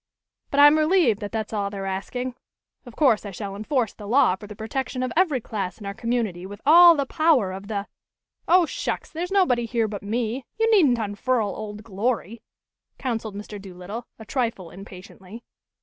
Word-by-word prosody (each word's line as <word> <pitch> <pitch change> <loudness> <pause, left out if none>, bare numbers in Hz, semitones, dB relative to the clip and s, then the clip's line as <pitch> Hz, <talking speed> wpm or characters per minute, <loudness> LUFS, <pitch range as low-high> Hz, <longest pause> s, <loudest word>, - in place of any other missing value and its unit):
But 280 - 0
I'm 290 +2 +8
relieved 310 - +3
that 205 -2 -6
that's 220 0 -4
all 200 -2 -1
they're 195 -1 -6
asking. 245 +7 -4 0.5
Of 240 - -11
course, 265 -8 +3
I 205 - -6
shall 195 +1 -6
enforce 225 +2 -1
the 205 - -10
law 230 -5 +4
for 205 +2 -12
the 210 - -9
protection 255 +4 -3
of 255 - -2
every 325 -6 +3
class 195 -5 -4
in 210 - -9
our 200 - -4
community 225 -5 -2
with 200 +2 -9
all 340 +3 +9
the 280 -2 0
power 290 - +2
of 195 +2 -8
the 205 -2 -3 0.3
" - - -65 0.2
"Oh, 355 0 +5
shucks! - - -4
There's 350 +3 -4
nobody 255 -12 +2
here 230 -1 0
but 205 -2 -6
me 230 +4 -2 0.2
you 450 0 +3
needn't 305 - +5
unfurl 220 +1 -1
Old 210 0 -7
Glory," 225 +1 -2 0.6
counseled 225 -5 -3
Mr. 205 0 -8
Doolittle, 195 +5 -8
a 220 - -11
trifle 225 -8 -2
impatiently. 195 +3 -12
225 Hz, 185 wpm, -24 LUFS, 200-265 Hz, 0.6 s, all